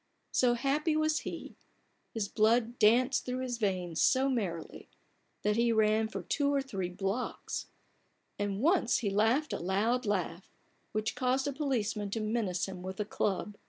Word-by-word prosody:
So 245 -1 +3
happy 290 +5 +1
was 310 0 +2
he, - - -7 0.6
his 220 -3 -2
blood 230 +3 +2
danced 250 +4 +4
through 255 0 -3
his 245 -2 -3
veins 180 -5 -1
so 265 +1 +4
merrily, 190 -11 -3 0.5
that 210 +1 +2
he 235 0 +3
ran 220 0 +3
for 195 -4 -6
three 285 - 0
or 285 -1 +2
four 195 -9 -4
blocks; 195 +6 -3 0.7
and 205 0 -1
once 320 -5 +3
he 200 - +1
laughed 225 +9 +2
a - - -2
loud 215 +7 0
laugh, 185 -3 -2 0.4
which 215 +1 -1
caused 255 +2 0
a 285 - -1
police 260 -7 -1
man 205 -1 -3
to 225 - -2
menace 215 -4 -1
him 185 -2 -7
with 190 +2 -6
a 210 - 0
club. 205 0 -2
220 Hz, 165 wpm, -31 LUFS, 200-255 Hz, 0.7 s, danced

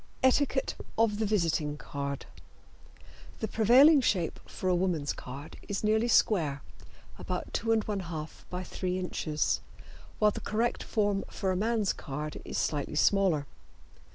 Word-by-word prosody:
ETIQUETTE 265 +1 +2 0.2
OF 220 -2 +2
THE 220 - +1
VISITING 165 -7 0
CARD. 140 -1 -5 1.1
The 220 - -1
prevailing 260 +8 +6
shape 180 -8 0
for 185 - -5
a 185 - +4
woman's 175 -5 0
card 140 +4 -9
is 200 +1 -3
nearly 220 +2 +3
square 160 -12 +2 0.6
(about - - -4
2 230 - -2
1/2 195 -8 -1 0.2
by 180 0 -4
3 185 0 -3
inches), 160 -4 -1 0.6
while 210 -1 +4
the - - -6
correct 230 +3 0
form 205 -2 0
for 190 - -1
a - - 0
man's 215 +1 +1
card 150 +2 -6
is - - -5
slightly 150 0 -1
smaller. 180 -4 +3
190 Hz, 135 wpm, -30 LUFS, 155-220 Hz, 1.1 s, prevailing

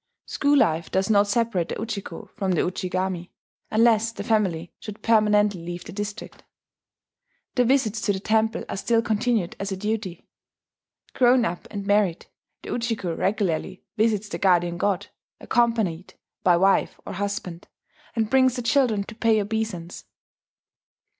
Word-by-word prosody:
School 285 0 +2
life 160 - +2
does 190 +3 0
not 205 -1 +4
separate 205 -5 0
the - - -3
Ujiko 210 -6 -6
from 195 -4 -1
the 170 - +2
Ujigami 185 -1 -2 0.4
(unless 225 0 +3
the - - -7
family 185 -8 0
should 210 -1 -9
permanently 210 -4 +3
leave 175 +1 -6
the - - -8
district); 205 +3 -6 1.1
the 250 - +3
visits 235 -4 +1
to 215 - +1
the 190 - -2
temple 220 +2 0
are - - -4
still 230 +3 +1
continued 220 -4 0
as 195 0 -3
a 190 - -3
duty. 210 -3 -4 0.9
Grown 245 -1 +4
up 175 -2 -4
and 200 -2 -5
married, 200 -4 +1 0.4
the - - -7
Ujiko 225 -8 -2
regularly 190 -2 -1
visits 215 -2 +1
the - - -5
guardian 175 -2 +2
god, 200 -2 0 0.3
accompanied 220 -8 0 0.3
by 175 -2 +4
wife 195 +2 +2
or - - -6
husband, 195 -3 -4 0.5
and 220 -2 0
brings 260 -1 +4
the 245 - -4
children 230 -4 +2
to 225 - -10
pay 225 -1 +2
obeisance. 205 -5 -4
205 Hz, 145 wpm, -24 LUFS, 185-225 Hz, 1.1 s, not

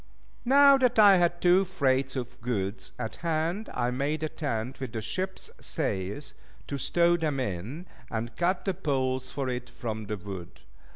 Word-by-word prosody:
Now 275 +2 +7
that 250 -2 +2
I 205 -3 +8
had 175 0 +2
two 180 +2 +5
freights 135 -7 0
of 125 -3 -5
goods 105 -4 -3
at 110 - -4
hand, 170 +5 -1
I 125 0 0
made 145 +5 -1
a 155 - 0
tent 125 -5 -3
with 130 -2 -5
the 115 - -2
ship's 185 - -3
sails, 100 +10 -2 0.3
to 140 - -4
stow 170 +4 +3
them 155 -5 -1
in, 125 - -4 0.2
and 115 0 -4
cut 180 +5 0
the 195 - +1
poles 130 -7 -1
for 140 -1 -3
it 125 -1 -3
from 110 -2 -5
the 105 - -3
wood. 95 -5 -8
135 Hz, 170 wpm, -28 LUFS, 115-175 Hz, 0.3 s, I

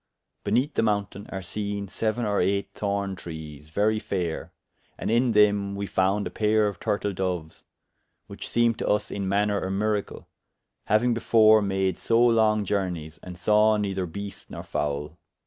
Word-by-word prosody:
Beneath 125 +8 +1
the - - +1
mountaine 100 -2 -1
are 95 -1 -5
seene 100 0 -4
seuen 110 +4 -2
or 100 -1 +1
eyght 100 +2 +1
thorne 100 -1 -2
trees, 80 -4 -9
very 105 +6 +1
fayre, 90 -6 -3 0.5
and - - -2
in 120 +1 +3
them 100 -1 +3
we 100 0 -3
found 95 +2 +1
a - - -4
payre 110 0 +2
of 100 -4 -5
turtle 100 0 -1
doues, 90 -4 -4 0.6
which - - -8
seemed 115 -1 +2
to - - -2
vs 105 0 0
in 100 -2 -3
maner 100 +1 +1
a 95 - -3
miracle, 105 +1 -2 0.6
hauying 120 +3 +3
before 110 -1 +5
made 95 -2 0
so 115 0 +2
long 110 -3 +3
journeyes, 90 -6 -3
and 90 -1 -9
sawe 105 +3 +4
neyther 95 -3 -2
beast 100 +5 -8
nor - - -7
foule. 75 +2 -3
100 Hz, 165 wpm, -26 LUFS, 95-110 Hz, 0.6 s, before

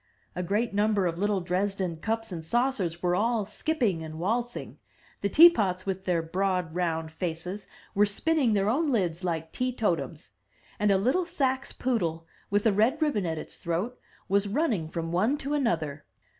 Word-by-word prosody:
A 180 - -2
great 205 +5 0
number 205 -1 +2
of 170 -1 -1
little 205 -1 +1
Dresden 185 -1 -1
cups 225 +4 -2
and 165 -3 -5
saucers 190 -4 0
were 175 0 +2
all 225 +1 +1
skipping 215 - 0
and 160 0 -7
waltzing; 235 +8 -2 0.4
the 200 - 0
teapots, 205 - +6
with 190 -1 -3
their 170 -3 +1
broad 180 -1 -1
round 165 -2 -1
faces, 180 +4 -4 0.3
were 205 +1 +4
spinning 270 +3 +1
their 200 -1 +2
own 290 +8 +2
lids 180 -7 0
like 165 -2 -2
tee 255 0 -1
totums; 210 -9 -2 0.5
and 210 -1 +3
a 195 - +5
little 265 - +1
Saxe 270 -6 -1
poodle, 170 -10 -1 0.2
with 205 +1 +1
a 220 - +4
red 225 +9 +3
ribbon 280 - +1
at 160 -1 -2
its - - -6
throat, 180 +9 -2 0.3
was 200 +1 +2
running 220 - 0
from 165 0 -4
one 215 +12 +2
to 285 0 -3
another. 160 - -1
200 Hz, 170 wpm, -28 LUFS, 175-240 Hz, 0.5 s, teapots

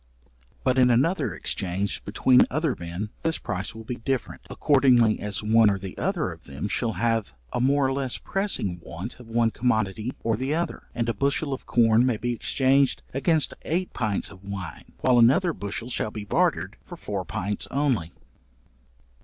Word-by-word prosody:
But 130 0 +2
in 125 -1 +6
another 135 +11 +2
exchange 95 +1 -2
between 125 +5 +4
other 155 -1 0
men, 85 +5 -5
this 165 0 0
price 100 +2 -4
will 110 - -8
be 120 +2 -5
different, 130 0 -3
accordingly 125 -6 +4
as 100 0 -2
one 110 0 +5
or 100 - +1
the 95 -1 -7
other 175 - -1
of 80 -1 -12
them 70 +7 -5
shall 115 +2 -1
have 115 -2 0 0.2
a - - 0
more 140 +2 +3
or 135 - +1
less 135 -2 -1
pressing 190 - -2
want 90 +10 -7
of 125 - -12
one 115 0 +2
commodity 110 -2 0
or 115 -1 +1
the 135 +5 -1
other; 170 0 -3
and 115 -1 -1
a 115 - +1
bushel 140 +5 0
of 130 - -7
corn 115 -1 +4
may 125 -3 +1
be 120 +2 -1
exchanged 135 +3 +2
against 150 +4 +1
eight 180 +3 -2
pints 110 -5 -1
of 95 -1 -14
wine, 95 -5 -7
while 125 -2 +4
another 160 +10 +5
bushel 105 +3 -5
shall 110 - -1
be 105 -1 -7
bartered - - 0
for - - -10
four 100 -2 -4
pints 100 +2 -3
only. 130 - 0
115 Hz, 180 wpm, -25 LUFS, 100-135 Hz, 0.2 s, in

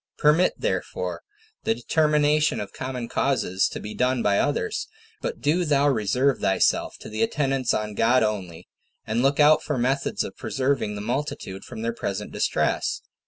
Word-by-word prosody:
Permit, 155 +5 +4
therefore, - - -3 0.4
the 225 +1 +1
determination 150 -2 +2
of 100 -1 -6
common 130 -2 -4
causes 110 -10 +1
to - - -6
be 105 - -7
done 125 -1 +1
by 100 -1 +3
others, 420 - -1 0.3
but - - -4
do 170 +5 +2
thou 145 -3 +3
reserve 130 +2 +2
thyself 95 - +1
to - - -9
the 110 +1 -4
attendance 135 +1 +1
on 105 0 -1
God 120 +4 +3
only, 95 -6 -3 0.4
and 115 +2 0
look 140 +2 +2
out 150 +1 +6
for 145 - -2
methods 135 +3 0
of - - -7
preserving 130 -6 -1
the 100 - -5
multitude 120 -5 -4
from 110 - -8
their 115 0 -1
present 100 -4 -4
distress. - - 0
130 Hz, 165 wpm, -25 LUFS, 110-145 Hz, 0.4 s, out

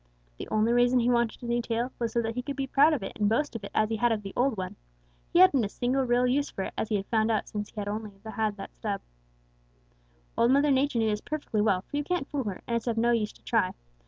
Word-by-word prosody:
The - - -5
only 215 +2 +2
reason 245 +1 +4
he 240 +1 +2
wanted 235 -1 0
a - - -4
new 240 0 0
tail 235 +2 -2
was 230 -2 -1
so 235 0 0
that 225 0 -2
he 250 - -2
could 275 +2 -5
be 275 0 -2
proud 285 +4 +5
of 275 - -2
it - - -4
and 205 -1 +3
boast 260 +4 0
of 225 - -5
it 200 - -6
as 215 0 +2
he 225 - -1
had 240 +2 +2
of 215 -2 -1
the 195 - -7
old 250 -2 +1
one. 185 -1 -4 0.6
He - - +2
hadn't 360 -9 +6
a 200 - -2
single 250 +5 0
real 245 0 +3
use 275 +3 +1
for 190 - -4
it, - - -5
as 220 - -2
he 215 - +1
had 195 -1 -1
found 220 0 +1
out 220 -2 0
since 210 -1 -5
he - - -22
had 205 - -3
had 205 - -1
only 215 -1 -6
that 220 -2 -3
stub. 200 -2 -3 1.3
"Old 235 - +3
Mother 280 +2 +4
Nature 270 -1 +2
knew 225 -1 +2
this 210 0 -2
perfectly 290 -8 -2
well, 195 -3 +2
for 290 - -5
you 290 - 0
can't 350 -3 -2
fool 275 -4 -3
her, 200 -3 -5
and 235 - -1
it's 230 - -6
of 230 -1 0
no 235 +1 +3
use 220 -3 +1
to - - -23
try. - - +1
235 Hz, 285 wpm, -28 LUFS, 215-255 Hz, 1.3 s, hadn't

